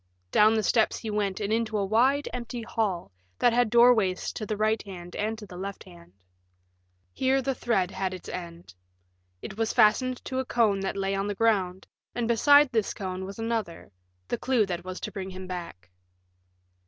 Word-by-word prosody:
Down 215 +1 +5
the 220 - +1
steps 220 0 +2
he 220 - -5
went 205 -2 -1
and 210 0 -1
into 225 -1 0
a 200 - 0
wide, 255 +8 +2
empty 240 -1 -5
hall 200 - -2 0.3
that 240 -1 +3
had 245 -1 +3
doorways 235 -5 +4
to 215 - -5
the 215 - -2
right 215 +1 +1
hand 175 -3 -10
and 220 +2 -2
to 215 - -9
the 180 -2 -11
left 195 +1 -6
hand. 85 0 -16 1.0
Here 265 +1 +2
the 270 +1 -1
thread 200 -7 0
had 190 -1 -2
its 185 -1 -8
end. 170 - -8 0.7
It 195 - -7
was 225 -1 0
fastened 245 +3 +3
to 260 - -2
a 260 - -2
cone 220 -5 +2
that 195 0 -3
lay 195 0 -1
on 195 +1 -1
the 205 - -3
ground, 190 -4 +1 0.3
and 240 -1 -1
beside 285 +4 +5
this 220 -4 0
cone 190 -1 -4
was 195 +1 -8
another 225 - -3 0.4
the - - -2
clue 250 -5 +2
that 175 -2 -4
was 185 0 -6
to - - -5
bring 190 -1 -5
him 185 0 -8
back. 170 - -8
210 Hz, 190 wpm, -27 LUFS, 185-230 Hz, 1.0 s, Down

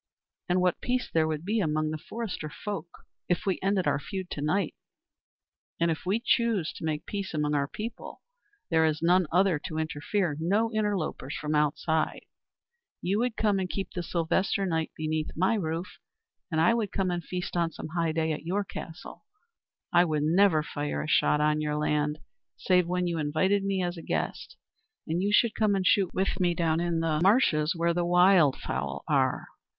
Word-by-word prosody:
And 180 +1 +3
what 180 -1 +1
peace 250 0 -1
there 160 -1 +3
would 155 +1 -3
be 220 +3 +1
among 155 -4 0
the 155 - -3
forester 195 -6 -5
folk 195 +1 -5 0.4
if 175 - 0
we 190 -2 0
ended 195 -1 +1
our 140 -1 +1
feud 190 +3 -6
to 145 - -4
night. 165 +4 0 1.1
And 170 0 +2
if 160 +2 -5
we 200 +4 +2
choose 230 -8 +1
to - - -10
make 155 0 -2
peace 200 -5 -4
among 150 -1 0
our 140 -1 +1
people 225 +9 -7 0.5
there 160 -1 +4
is 155 0 0
none 180 0 +4
other 180 -2 +3
to 155 +1 -6
interfere, 160 +2 -1
no 205 +7 +1
interlopers 200 -10 -2
from 150 0 -3
outside... 155 +1 0 0.8
You 195 +4 +1
would 245 -1 -1
come 205 -3 +2
and 185 -1 -2
keep 195 +1 -4
the 175 - -4
Sylvester 175 +3 0
night 160 -3 -1
beneath 155 0 -2
my 185 +7 +2
roof, 170 -2 -3 0.5
and 160 - +1
I 170 +8 +5
would 225 -4 -1
come 190 -2 0
and 175 -1 -2
feast 180 +1 -5
on 170 -1 +1
some 155 - -8
high 165 0 0
day 160 0 0
at 150 - -3
your 190 +5 -1
castle... 165 -3 -9 0.7
I 175 0 +6
would 155 -3 0
never 165 0 +4
fire 145 -1 -3
a - - -5
shot 150 -1 +3
on 150 0 +2
your 150 -1 -1
land, 150 0 0 0.4
save 180 -2 +2
when 180 0 0
you 170 -2 -1
invited 185 +7 +1
me 195 -1 0
as 175 0 -3
a - - -7
guest; - - -3 0.5
and 170 +2 -1
you 200 +2 +1
should 220 +1 +4
come 210 -2 +2
and 190 -1 -1
shoot 195 0 +3
with 190 0 -1
me 175 -2 +2
down 165 -1 +1
in 170 -1 0
the 160 -2 +1
marshes 175 - +3
where 170 0 +1
the 175 +1 0
wildfowl 165 - +3
are. - - +1
170 Hz, 190 wpm, -28 LUFS, 155-195 Hz, 1.1 s, I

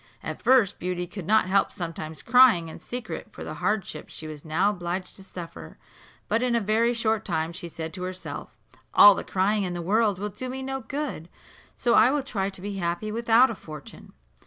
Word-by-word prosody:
At - - -5
first 250 -7 +4
Beauty 180 0 -2
could 175 -1 -8
not 215 0 +4
help 195 +2 +2
sometimes 165 -2 -6
crying 235 -9 +5
in - - -9
secret 245 0 -6
for - - -9
the - - -6
hardships 195 -7 -2
she 160 - -8
was 155 -2 -8
now 175 +6 +2
obliged 180 -1 -4
to 195 - -12
suffer; 165 - -9 0.5
but 225 +2 +1
in 250 -1 +1
a - - +3
very 225 +3 +2
short 220 -2 0
time 165 -3 -2
she 175 -1 -6
said 160 0 -6
to 180 - -5
herself, 185 0 -6 0.4
"All 205 - +10
the - - -4
crying 205 +3 +1
in 180 -2 -2
the - - -4
world 205 +3 +2
will 205 +2 -3
do 255 +6 -6
me 265 +1 -5
no 270 0 -3
good, 270 - -5 0.5
so 240 -2 +1
I 235 - +6
will 285 0 0
try 200 -7 -2
to 190 - -10
be 200 0 -5
happy 175 +4 -2
without 235 +3 +4
a - - -5
fortune." 155 -5 -11
195 Hz, 205 wpm, -26 LUFS, 175-230 Hz, 0.5 s, All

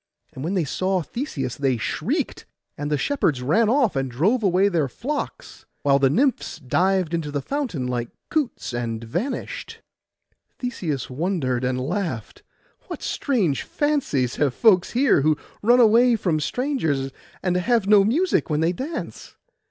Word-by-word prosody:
And 130 - -7
when 175 +5 -1
they 180 - +2
saw 185 +5 -1
Theseus 145 - -4
they 135 -3 +1
shrieked; - - -2 0.3
and 145 +1 -4
the 150 - +1
shepherds 150 - 0
ran 210 - +3
off, 245 - +2
and 135 -1 -1
drove 185 - +1
away 190 -1 +3
their 165 -7 +1
flocks, 280 - -5 0.2
while 140 -1 +4
the 135 -1 +4
nymphs 260 - +1
dived 180 +5 +1
into 165 -3 -1
the 145 0 -2
fountain 240 - -3
like 120 -1 -2 0.2
coots, 285 - -1
and 115 -1 -3
vanished. 175 - -4 0.7
Theseus 170 - -3
wondered 130 -4 -1
and 125 0 0
laughed: 145 - -3 0.5
'What - - -7
strange 205 - 0
fancies 275 - 0
have 140 -4 +1
folks 185 -6 +4
here 255 - +4
who 155 +1 +2 0.2
run 240 +4 +5
away 235 +1 +6
from 175 -7 0
strangers, 155 - -1 0.3
and 180 -1 +1
have 225 +3 +2
no 205 0 +6
music 310 - +1
when 150 0 +1
they 165 +2 +3
dance! 280 - -6
175 Hz, 150 wpm, -23 LUFS, -, 0.7 s, away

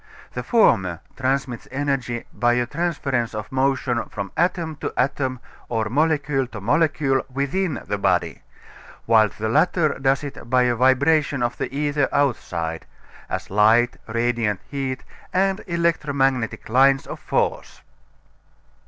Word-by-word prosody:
The - - -3
former 95 - +3 0.2
transmits 130 -2 -2
energy 135 -4 -2
by 120 0 +2
a 120 0 +1
transference 135 -6 -2
of 105 -1 -6
motion 130 -2 +1
from 100 -2 -5
atom 170 -3 0
to - - -4
atom 130 -1 0 0.3
or 110 -2 -1
molecule 145 -1 +1
to 110 -4 -8
molecule 135 - +2
within 145 +5 -1
the 100 +1 -2
body, - - 0 0.6
while 110 -2 +5
the 110 +2 -4
latter 155 +6 +2
does 135 +1 +1
it 140 -4 -8
by 125 0 +4
a 125 -1 +2
vibration 135 +2 +3
of 120 0 -1
the - - -3
ether 145 0 0
outside 85 - -1 0.4
as - - -4
light, 110 +4 +4
radiant 115 -3 0
heat, 135 -2 -3 0.3
and 195 +2 +1
electromagnetic 140 - 0
lines 135 +4 +4
of - - -7
force. - - -2
130 Hz, 130 wpm, -22 LUFS, 120-145 Hz, 0.6 s, while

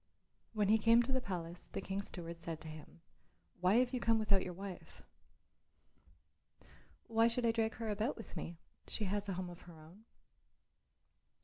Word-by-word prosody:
When 210 -2 +2
he 220 +1 +6
came 230 +2 +6
to 255 - -1
the 260 0 +2
palace 175 -4 -5
the - - -1
King's 195 +1 -3
steward 170 -2 -6
said 165 -1 -5
to - - -7
him, 155 +1 -10 0.6
"Why 180 +3 +4
have 250 +1 +4
you 250 - +1
come 230 -1 +4
without 205 -3 +3
your 185 - -3
wife?" 195 -1 -8 2.0
"Why 225 0 +4
should 235 +1 +1
I 230 - +5
drag 225 -1 0
her 230 - -4
about 215 +5 0
with 225 - -9
me? 165 0 -5 0.3
She 220 - -2
has 205 +1 -1
a - - 0
home 180 0 -3
of 175 - -11
her 170 -2 -13
own." 175 +8 -15
200 Hz, 180 wpm, -36 LUFS, 175-225 Hz, 2.0 s, he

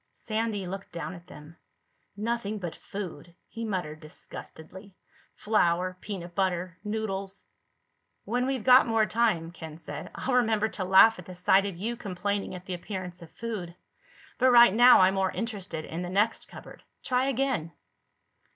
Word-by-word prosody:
Sandy 220 -3 -3
looked 195 +2 -7
down 170 +2 -5
at 175 0 -13
them. 155 -1 -13 0.6
"Nothing 215 -1 -2
but 175 -5 -5
food," 175 -4 -8
he 230 - -7
muttered 180 -8 -3
disgustedly. 175 +4 -11 0.4
"Flour, 185 -3 +1
peanut 180 -4 -6
butter, 180 -2 -1
noodles...." 200 -2 -4 0.8
"When 245 +4 0
we've 265 -4 -2
got 255 +1 +7
more 225 -1 +3
time," 215 -8 +1
Ken 160 -2 -9
said, 155 +1 -7
"I'll 260 - -2
remember 220 -3 +2
to 195 - -4
laugh 190 +3 +6
at 180 - -10
the 185 - -9
sight 190 +2 +3
of 190 -4 -6
you 225 +6 -3
complaining 200 -1 -3
at 180 0 -10
the 185 - -4
appearance 180 0 -6
of 170 - -11
food. 200 -7 -6 0.6
But 260 0 +5
right 240 -5 +8
now 245 0 +8
I'm 185 +1 +5
more 190 -1 +1
interested 200 -9 -5
in 165 +2 -5
the 175 - -4
next 210 +5 +1
cupboard. - - -12 0.2
Try 255 0 +1
again." 265 - -1
195 Hz, 160 wpm, -28 LUFS, 175-225 Hz, 0.8 s, right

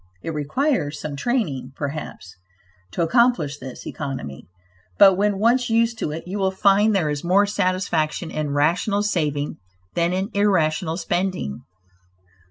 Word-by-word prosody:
It 165 - -4
requires 155 - -1
some 150 -2 -5
training, 145 - -2
perhaps, 140 - -6 0.6
to 170 - 0
accomplish 170 - +2
this 130 -2 -9
economy, 130 - -6 0.5
but 195 - +8
when 205 +1 +1
once 240 +4 +2
used 230 0 +2
to - - -2
it, 155 +2 -5
you 195 +3 -4
will 190 -1 +2
find 200 +2 +3
there 160 -6 +1
is 145 -1 -4
more 190 +4 +4
satisfaction 185 -5 -1
in 155 -1 -2
rational 170 +8 +1
saving 150 -8 -1 0.4
than 170 0 +1
in 190 +4 -2
irrational 170 -5 +1
spending. 180 - -2
180 Hz, 140 wpm, -22 LUFS, 150-205 Hz, 0.6 s, but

